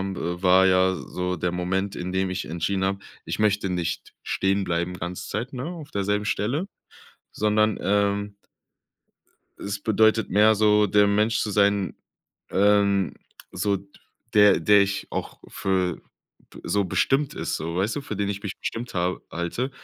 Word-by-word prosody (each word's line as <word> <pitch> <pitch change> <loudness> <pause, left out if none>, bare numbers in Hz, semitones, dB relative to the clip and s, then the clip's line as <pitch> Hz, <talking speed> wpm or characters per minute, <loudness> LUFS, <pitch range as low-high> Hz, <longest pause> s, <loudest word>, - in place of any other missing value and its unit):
habe, 85 +1 -4
war 95 +1 +6
ja 95 0 +4
s - - -5
so 90 0 -1
der 90 - -1
Moment, 95 +3 -2
in 90 +1 -4
dem 95 0 0
ich 90 - -3
entschieden 90 +4 -2
habe: 95 0 -1 0.3
„Ich - - -4
möchte 105 -2 +1
nicht 90 -2 -3
stehen 95 +1 0
bleiben 85 0 -1
ganze 90 +1 -6
Zeit, 115 +7 -4
ne, 130 +1 -4
auf 165 -5 -8
derselben 105 +1 -1
Stelle, 125 - -1 0.7
sondern, 110 0 +1
ähm“ 100 0 0 1.2
„es 100 0 -4
bedeutet 110 +1 +3
mehr 105 +3 +5
so, 105 0 +4
der 105 +1 +4
Mensch 105 +2 +2
zu 105 - -1
sein, 100 -1 +2 0.6
ähm 100 -1 +3 0.4
so 100 -1 +1 0.6
der 105 -4 +6
der 100 +5 +5
ich 100 0 0
auch - - -5
für 95 -3 -1 0.5
b - - -12
so 100 -1 +1
bestimmt 135 +9 +1
ist“, - - -2
so, 85 +2 -4
weißt 100 +8 0
du, - - -1
für 110 -7 -6
den 100 0 -1
ich 100 0 -5
mich 100 - -5
bestimmt 120 +1 -5
habe 90 0 -1
halte. 85 +10 -3
100 Hz, 165 wpm, -24 LUFS, 95-105 Hz, 1.2 s, war